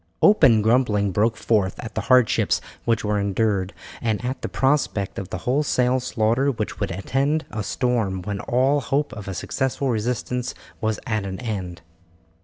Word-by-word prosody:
Open 135 - +6
grumbling 110 -4 +2
broke 110 +4 +1
forth 105 -4 +1
at 115 -2 -7
the - - -2
hardships 130 -3 +3 0.3
which 115 -2 +1
were 105 0 +1
endured, 100 -1 0 0.3
and 115 0 -1
at 130 +2 -3
the - - -3
prospect 135 -8 0
of 95 -1 -6
the - - -4
wholesale 130 -1 +2
slaughter 125 +2 +1
which 115 -6 -3
would 100 - -1
attend 135 - 0
a 110 0 -3
storm 110 -4 -1
when 100 0 -3
all 135 +4 +2
hope 140 +4 -1
of 105 -2 -8
a 95 - -4
successful 135 +7 -1
resistance 125 +2 -2 0.3
was 110 -1 0
at 110 -4 -1
an 95 -1 -5
end. 95 -8 -4
115 Hz, 165 wpm, -23 LUFS, 100-130 Hz, 0.3 s, Open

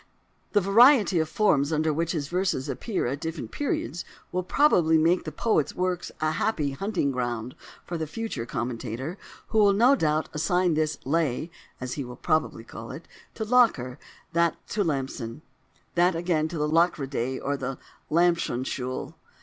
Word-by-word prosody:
The 205 - +4
variety 210 - +6
of 160 -1 0
forms 150 -9 +2
under 155 0 +1
which 165 +3 -1
his 150 -4 -2
verses 180 -6 -1
appear 220 -5 -2
at 135 +4 -2
different 160 0 -5
periods 175 - -2 0.3
will 185 - 0
probably 175 - +4
make 170 +3 +3
the - - -4
poet's 215 -11 0
works 180 -1 -1
a 155 0 +1
happy 155 -3 0
hunting 175 -1 -1
ground 120 -2 -3 0.3
for 170 -2 -4
the 160 - -2
future 220 - -4
commentator, 120 - -4 0.3
who 220 - +2
will 205 -1 +6
no 240 +7 +5
doubt 155 - +1
assign 175 +3 +2
this 155 -1 0
"lay" 155 +1 0 0.3
(as 130 -1 -4
he 140 - -3
will 125 -1 -8
probably 155 -4 0
call 115 0 -9
it) 165 - -9 0.3
to 220 - -3
Locker, 210 - +3 0.3
that 170 0 +3
to 210 - 0
Lampson, 135 -4 -3 0.5
that 175 +1 +3
again 165 -2 0
to 165 +1 -6
the 150 0 0
Lockeridae 140 -6 +1
or 140 +1 -1
the 135 -1 -4 0.3
Lampsonschule. 135 -6 0
160 Hz, 160 wpm, -26 LUFS, 135-180 Hz, 0.5 s, variety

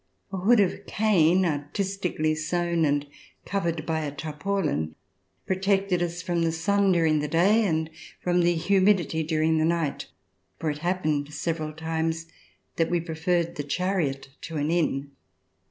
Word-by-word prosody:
A - - -1
hood 215 +6 +4
of 195 -3 0
cane 190 -4 +3
artistically 165 +1 -1
sewn 170 +1 0
and 145 0 +1 0.4
covered 170 -5 -2
by 160 -1 0
a 150 -2 -3
tarpaulin 150 - -2 0.5
protected 195 -1 +1
us 175 0 -2
from 175 -1 0
the 165 -1 +2
sun 195 +5 +2
during 160 -3 +3
the 150 - -1
day 190 +9 +4
and 160 -2 0 0.3
from 180 0 +1
the 175 0 +3
humidity 185 -1 +2
during 160 0 +1
the - - +2
night, 165 -3 -1 0.5
for 160 -2 -1
it 145 - -6
happened 155 -4 -1
several 155 0 -2
times 160 +1 -2 0.5
that 165 - +2
we 175 - +1
preferred 170 +1 -1
the 145 - -2
chariot 150 -3 -1
to 165 -1 -5
an 150 +2 0
inn. 145 -5 0
165 Hz, 150 wpm, -26 LUFS, 155-180 Hz, 0.5 s, hood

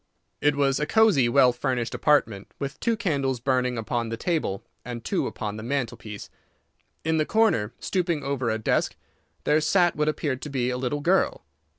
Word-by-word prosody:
It 145 0 +3
was 135 -1 +2
a 150 - -1
cosey, 205 - +4
well 125 0 +5
furnished 120 -1 -2
apartment, 115 -10 +1
with 140 0 -5
two 230 -2 0
candles 140 - 0
burning 125 -1 0
upon 115 +1 -2
the 115 - -3
table 150 - -1 0.2
and 120 -1 -6
two - - 0
upon 105 0 -5
the - - -6
mantelpiece. 115 -5 -4 0.7
In 160 0 +1
the 155 - +3
corner, 215 - +2
stooping 170 -5 -1
over 135 -4 -1
a 110 - 0
desk, 110 - 0 0.5
there 155 +1 +3
sat 175 +3 +3
what 150 +1 +1
appeared 140 -4 -2
to 150 - -6
be 125 -3 -1
a 125 - -2
little 135 +3 -2
girl. 185 +5 +2
135 Hz, 180 wpm, -25 LUFS, 120-155 Hz, 0.7 s, well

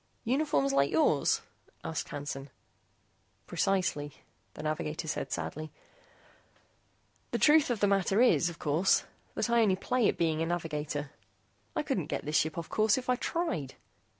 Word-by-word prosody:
"Uniforms 225 - +1
like 140 0 +3
yours?" 155 -2 +2 0.4
asked 160 - -4
Hansen. 140 -1 -5 1.0
"Precisely," 185 -7 0 0.4
the - - -7
navigator 155 +1 -3
said 155 - -3
sadly. 155 0 -4 1.6
"The - - -1
truth 300 -1 +5
of 235 -4 -1
the - - +5
matter 195 +1 +2
is, 235 -8 +4
of 170 - -9
course, 160 +6 +2 0.3
that - - 0
I 235 0 +3
only 200 -4 +4
play 245 +4 +1
at - - 0
being 160 -1 +1
a 165 - 0
navigator. 150 -4 -3 0.6
I - - 0
couldn't - - -2
get - - -3
this 150 +1 -2
ship 155 +1 +2
off 170 - -4
course, 215 +1 +2
if 255 -1 -1
I - - +3
tried. 175 - -2
165 Hz, 150 wpm, -30 LUFS, 150-215 Hz, 1.6 s, truth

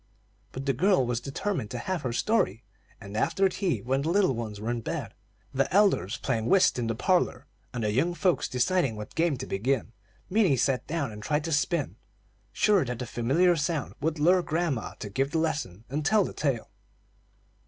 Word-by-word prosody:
But 130 +1 -6
the 135 - +2
girl 180 0 +3
was 120 -1 -1
determined 140 - -3
to 125 - -5
have 180 +7 -3
her 125 - -2
story; 120 - +1 0.4
and 100 -1 -9
after 195 - +2
tea, 185 -5 -1
when 135 +2 0
the 155 - -1
little 185 -5 +3
ones 110 -3 -5
were 110 +3 -2
in 120 -1 -2
bed, - - -4 0.4
the 135 +1 0
elders 190 - +3
playing 115 -4 -1
whist 190 -9 +4
in 120 - -1
the 115 - -1
parlor, 165 - +1 0.3
and 120 -3 -4
the 105 - +1
young 165 +10 +1
folks 175 +2 +1
deciding 135 -1 +1
what 105 0 -8
game 165 -4 +1
to 130 - -5
begin, 115 +3 -1 0.4
Minnie 185 -9 +3
sat 125 0 0
down 145 -5 -2
and 105 0 -9
tried 150 +6 0
to 165 - -3
spin, 150 - 0 0.5
sure 205 -4 +3
that 125 -2 -4
the 125 - -4
familiar 140 +11 +2
sound 155 -2 -2
would 160 +2 0
lure 180 +5 +4
grandma 160 -7 -2
to - - -7
give 135 +6 0
the 160 - -1
lesson 150 - -2
and 145 +4 -3
tell 205 +6 +4
the - - -6
tale. 135 -6 -2
140 Hz, 195 wpm, -27 LUFS, 120-175 Hz, 0.5 s, whist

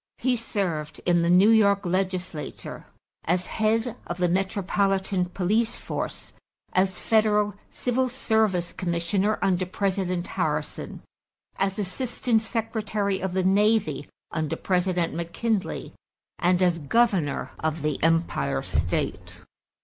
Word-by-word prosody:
He 255 0 +1
served 175 -10 -3
in 175 -1 +4
the 170 - +1
New 185 +5 +6
York 200 -3 +4
legislature, 185 -3 -3 0.4
as 180 +2 +1
head 225 +2 0
of 175 - -4
the 180 -1 +2
metropolitan 195 0 +1
police 210 +6 0
force, - - -5 0.4
as 185 0 +2
federal 210 -2 +2 0.2
civil 255 +1 0
service 220 -8 +1
commissioner 185 +4 0
under 185 -2 +1
President 185 -2 -1
Harrison, 155 -4 -3 0.6
as 195 0 0
assistant 225 +3 0
secretary 215 -3 -1
of 190 -1 -2
the 190 0 +1
navy 195 -6 +2 0.2
under 155 -2 -1
President 180 -2 0
McKinley, 185 +6 -2 0.5
and 180 +1 +3
as 175 -2 +2
governor 175 - +1
of 155 -1 -2
the 150 -2 -1
Empire 165 - +1
state. - - -2
190 Hz, 115 wpm, -26 LUFS, 175-215 Hz, 0.6 s, New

